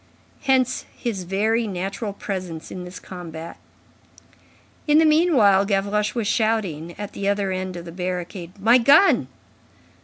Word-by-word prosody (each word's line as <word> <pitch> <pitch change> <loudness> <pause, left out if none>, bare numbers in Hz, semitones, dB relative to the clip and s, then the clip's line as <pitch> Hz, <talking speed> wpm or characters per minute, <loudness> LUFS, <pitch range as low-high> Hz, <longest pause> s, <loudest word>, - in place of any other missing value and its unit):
Hence 260 -2 +1
his 205 -7 -3
very 220 +5 0
natural 195 +3 -4
presence 185 -5 -6
in 180 -1 -6
this 180 +1 -9
combat. 170 -2 -9 1.3
In 295 0 +5
the 320 - +6
meanwhile, 295 - +4
Gavroche 205 +2 0
was 230 -3 -1
shouting, 195 -8 -1
at 205 0 -6
the 200 - -3
other 200 -1 0
end 185 0 -3
of 170 -1 -7
the 170 - -8
barricade: 180 +1 -5
"My 230 +5 +5
gun!" 285 +11 +5
200 Hz, 140 wpm, -23 LUFS, 180-225 Hz, 1.3 s, the